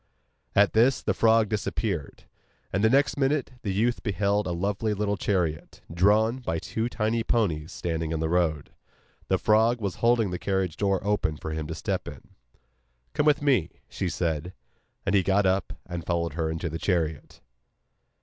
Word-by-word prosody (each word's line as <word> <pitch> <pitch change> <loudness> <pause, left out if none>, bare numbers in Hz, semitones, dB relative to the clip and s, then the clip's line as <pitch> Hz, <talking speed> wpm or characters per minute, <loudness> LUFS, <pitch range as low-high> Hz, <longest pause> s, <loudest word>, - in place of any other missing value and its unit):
At 100 0 +4
this 120 +4 +4
the - - +1
frog 115 -1 +4
disappeared; 100 -6 -3 0.5
and 95 +3 +1
the 110 - +5
next 140 +4 +3
minute 135 0 +1
the 100 - -2
youth 115 +5 0
beheld 100 0 0
a - - -2
lovely 100 +5 -1
little 105 0 0
chariot, 85 -7 -2
drawn 105 +7 +3
by 85 -10 -2
two 110 +8 -3
tiny 115 0 0
ponies, 85 -11 0
standing 80 -2 -3
on 80 - -1
the 80 - 0
road. 80 -4 0 0.6
The - - +2
frog 110 +3 +3
was 100 -4 -3
holding 115 -4 +3
the 90 - -3
carriage 95 -4 -1
door 100 -1 0
open 100 -7 0
for 80 +3 -6
him 80 -1 -3
to - - -5
step - - -3
in. - - -10 0.8
'Come 150 - +1
with 145 -1 +3
me,' 125 - +3 0.2
she 95 - -3
said. 85 0 -2 0.5
And 100 - 0
he 100 - +5
got 100 +2 +2
up 95 0 +1
and 85 -1 -5
followed 85 -2 -1
her 80 0 -1
into 80 +1 -3
the 80 +1 -4
chariot. 80 -6 -2
100 Hz, 175 wpm, -26 LUFS, 85-110 Hz, 0.8 s, the